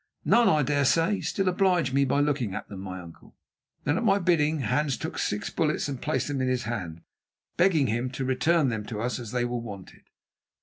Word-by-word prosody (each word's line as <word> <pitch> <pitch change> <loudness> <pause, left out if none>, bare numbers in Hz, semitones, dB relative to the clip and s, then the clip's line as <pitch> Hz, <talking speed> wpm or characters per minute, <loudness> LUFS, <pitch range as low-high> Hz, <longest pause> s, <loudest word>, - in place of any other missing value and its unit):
"None, 235 0 +5
I 150 -1 +3
dare 145 +1 +1
say. 165 +9 +2
Still, 195 -1 -1
oblige 180 -6 +2
me 140 0 +3
by 140 +2 +1
looking 135 -9 0
at - - -6
them, 100 - -8
my 95 -1 -6
uncle." 85 -2 -14 0.5
Then 145 +4 +1
at - - -1
my 200 -3 +4
bidding 160 -5 +2
Hans 145 0 0
took 160 - -5
six 105 - -2
bullets 155 -3 0
and 135 -3 -5
placed 130 0 -1
them 140 -3 -2
in 130 - 0
his 130 -1 0
hand, 90 -8 -5 0.5
begging 175 -5 +3
him 120 +2 -1
to 130 +1 -3
return 140 +3 +2
them 110 -3 -3
to 110 -3 -5
us 125 +3 -2
as 120 -3 -7
they 125 -1 0
were 120 0 -2
wanted. 100 -5 -10
135 Hz, 215 wpm, -27 LUFS, 120-160 Hz, 0.5 s, None